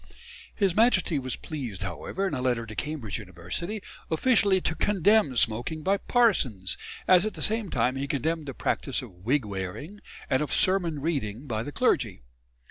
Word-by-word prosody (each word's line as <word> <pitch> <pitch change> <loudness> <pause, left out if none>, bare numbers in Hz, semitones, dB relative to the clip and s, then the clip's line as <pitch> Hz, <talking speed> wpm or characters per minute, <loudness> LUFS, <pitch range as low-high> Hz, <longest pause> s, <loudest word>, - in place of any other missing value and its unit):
His 195 -4 +1
Majesty 205 - +3
was 130 -2 -2
pleased, 125 - -6
however, 195 +2 -3
in 180 - -4
a 130 - -2
letter 120 -2 0
to 110 - -8
Cambridge 135 - -4
University, 200 +4 -5 0.3
officially 200 +2 +3
to 160 - -1
condemn 200 -3 +3
smoking 120 +9 +1
by 195 +4 +2
parsons, 135 - +1 0.3
as 180 -1 +6
at 215 - -3
the - - -8
same 220 -2 +2
time 125 -1 +1
he 135 +1 -3
condemned 155 +3 -1
the 135 - -5
practice 135 0 -1
of 120 - -10
wig 115 +10 0
wearing 100 - -6 0.3
and 130 - +1
of 150 - -2
sermon 175 -6 +3
reading 135 -6 -2
by 110 -5 -2
the 145 - -5
clergy. - - +1
150 Hz, 170 wpm, -27 LUFS, 120-190 Hz, 0.3 s, as